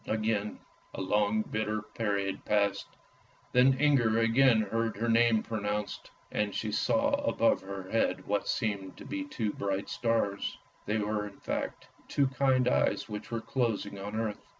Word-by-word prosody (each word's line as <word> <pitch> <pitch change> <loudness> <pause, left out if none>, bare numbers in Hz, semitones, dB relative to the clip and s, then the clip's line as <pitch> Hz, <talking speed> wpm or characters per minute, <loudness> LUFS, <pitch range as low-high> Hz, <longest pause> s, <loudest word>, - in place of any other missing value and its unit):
Again 110 -1 -1 0.4
a - - -4
long 105 +2 +2
bitter 110 0 -2
period 100 -3 -2
passed. 100 -1 +1 0.6
Then 130 +1 +5
Inger 130 -7 +4
again 115 +1 +5
heard 115 +1 -1
her 115 +2 -1
name 115 -1 +4
pronounced, 105 -2 -3 0.2
and 105 -1 -1
saw 275 - +1
above 115 - +2
her 95 -1 -7
head 115 - +1
what 105 0 -1
seemed 100 -5 -2
to - - -10
be 290 - -3
two 115 - -3
bright 100 0 -2
stars; 115 -4 0 0.3
they 105 +2 +1
were 105 0 -1
in 100 - -13
fact - - -4 0.2
two 140 - +2
kind 130 -1 +2
eyes - - +2
which 105 -1 -6
were 115 -1 -2
closing 110 -6 -1
on 100 +2 -5
earth. 110 -2 -2
110 Hz, 150 wpm, -30 LUFS, 105-115 Hz, 0.6 s, Then